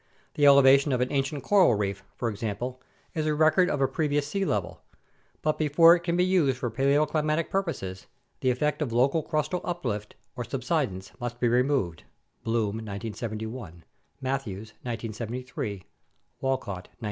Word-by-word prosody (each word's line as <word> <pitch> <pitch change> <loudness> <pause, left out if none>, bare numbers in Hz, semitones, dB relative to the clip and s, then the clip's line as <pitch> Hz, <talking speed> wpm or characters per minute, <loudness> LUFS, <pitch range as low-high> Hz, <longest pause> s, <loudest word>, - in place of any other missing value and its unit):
The 145 -1 +4
elevation 140 0 +7
of 125 - +1
an 125 - 0
ancient 140 0 -1
coral 190 - +5
reef, 100 -1 -2
for 120 - -2
example, 115 +4 -4 0.3
is 155 -1 -1
a 150 - +1
record 160 +4 +4
of 145 - -1
a 135 - +4
previous 145 +1 0
sea 195 +6 -1
level; 105 - -2 0.6
but 155 0 0
before 165 +3 +6
it - - -2
can 170 0 -1
be 180 - +4
used 165 -9 +2
for 125 -3 -3
paleoclimatic 150 +5 +1
purposes 155 - -3 0.3
the 130 - +1
effect 150 +5 0
of 140 -6 -1
local 135 +7 +3
crustal 155 +3 -1
uplift 115 - -3 0.2
or 125 - -3
subsidence 125 - -2
must 120 0 -5
be 120 - +2
removed 120 - +1 0.4
(Bloom, 110 -2 0
1971; 110 -3 -6 0.4
Matthews, 130 -6 -3
1973; 115 -2 -5 0.6
Walcott, 115 -9 -2
1972). - - -33
130 Hz, 150 wpm, -27 LUFS, 110-150 Hz, 0.6 s, elevation